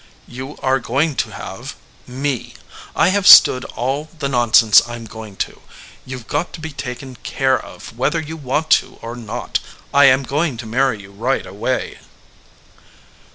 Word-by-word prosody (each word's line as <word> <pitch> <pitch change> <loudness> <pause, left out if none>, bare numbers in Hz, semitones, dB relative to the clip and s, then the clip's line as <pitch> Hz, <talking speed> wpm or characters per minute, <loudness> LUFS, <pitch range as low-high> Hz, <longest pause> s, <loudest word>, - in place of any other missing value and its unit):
"You 130 +3 -8
are 135 0 +2
going 140 +6 0
to - - 0
have - - -8 0.3
me. 130 0 -3 0.4
I - - +4
have 200 +1 +1
stood 130 0 +9
all 135 +6 -3
the 145 -3 -2
nonsense 120 -4 +5
I 120 - -6
m 115 -1 -9
going 110 -2 -10
to. - - -18 0.5
You 130 0 -5
ve 125 - -11
got 175 - -2
to - - -8
be 160 0 -6
taken 130 -1 -7
care 130 +3 0
of 115 - -12
whether 135 +7 0
you 160 0 -6
want 150 +1 -2
to - - -17
or 115 +1 -6
not. 120 0 -4 0.3
I 140 0 +6
am 135 0 +5
going 145 0 -1
to 115 - -7
marry 125 0 0
you 100 - -14
right 120 +7 -1
away." 105 +7 -3
130 Hz, 170 wpm, -19 LUFS, 120-140 Hz, 0.5 s, stood